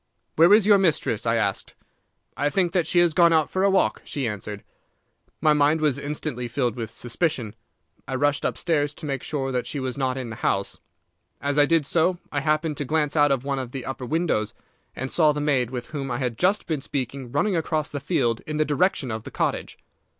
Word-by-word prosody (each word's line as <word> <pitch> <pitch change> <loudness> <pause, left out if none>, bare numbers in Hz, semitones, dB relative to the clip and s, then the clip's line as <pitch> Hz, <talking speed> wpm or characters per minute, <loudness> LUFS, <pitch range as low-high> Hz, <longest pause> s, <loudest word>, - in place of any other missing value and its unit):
"'Where 165 +4 +6
is 210 -1 +7
your 205 -1 +6
mistress?' 150 - +1
I 115 - +3
asked. 100 -4 -2 0.6
"'I 145 +2 +1
think 180 +1 +1
that 175 -3 +1
she 175 - 0
has 175 -2 +5
gone 170 +1 +5
out 160 -2 +2
for 185 - -1
a 200 - +5
walk,' 195 0 +2
she 135 -4 -3
answered. 105 -1 -6 0.8
"My 155 -1 +5
mind 150 +2 +3
was 150 -3 +1
instantly 140 -4 -4
filled 120 -1 -1
with 115 -3 -5
suspicion. 120 -1 -2 0.5
I 130 - -3
rushed 145 +2 +1
upstairs 145 -3 0
to 160 - -8
make 135 -3 -2
sure 135 -3 -3
that 125 -1 -2
she 145 - -3
was 130 0 -3
not 130 -1 0
in 125 -3 -5
the 110 - -7
house. 100 0 -1 0.6
As 145 +1 0
I 145 - +5
did 165 -3 +2
so 170 +4 +1
I 145 - 0
happened 155 +1 0
to - - -2
glance 150 +1 0
out 145 -2 +4
of 135 -2 +1
one 140 -1 -2
of 125 -2 -6
the 135 -2 -5
upper 135 -1 -5
windows, 155 -9 0 0.4
and 130 +1 -4
saw 155 -3 +4
the 150 - -3
maid 140 -5 +1
with 125 -2 -6
whom 140 -3 -4
I 120 - -2
had 125 -3 -2
just 185 - +1
been 155 -5 -2
speaking 135 -3 -4
running 185 +8 +1
across 155 -2 -1
the 145 - -4
field 120 -6 0
in 155 -1 -3
the 155 - +2
direction 145 -3 +1
of 110 0 -4
the - - -8
cottage. - - -2
145 Hz, 220 wpm, -24 LUFS, 125-160 Hz, 0.8 s, is